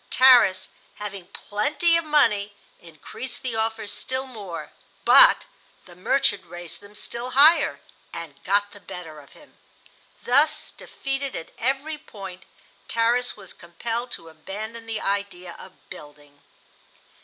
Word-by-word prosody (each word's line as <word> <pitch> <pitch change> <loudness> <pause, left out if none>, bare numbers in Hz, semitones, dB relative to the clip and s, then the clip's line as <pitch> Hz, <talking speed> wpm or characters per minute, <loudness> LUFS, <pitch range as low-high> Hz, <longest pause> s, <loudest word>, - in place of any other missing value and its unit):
Tarras, 245 -8 +6 0.3
having 200 -3 -7
plenty 295 - 0
of 335 - +2
money, 210 -10 +2 0.2
increased 170 - -8
the 250 -3 -3
offers 220 -1 -2
still 260 +1 -3
more; 210 -9 -8 0.3
but - - +8 0.4
the 175 - -15
"merchant" 205 +1 +1
raised 175 +1 -9
them 205 +1 -16
still 235 +4 -4
higher 310 +4 +6 0.3
and 165 -4 -9
got 205 +1 +1
the 205 - -14
better 165 -6 -9
of 140 - -17
him. 300 - -20 0.6
Thus, 285 +5 +2
defeated 275 0 -4
at 165 - -7
every 275 +5 -1
point, 195 -9 -10 0.4
Tarras 240 +2 +1
was - - -9
compelled 230 +8 -5
to 165 - -5
abandon 215 +8 -8
the 225 -1 -3
idea 195 -3 -3
of 185 - -15
building. 145 -1 -13
210 Hz, 130 wpm, -24 LUFS, 180-260 Hz, 0.6 s, but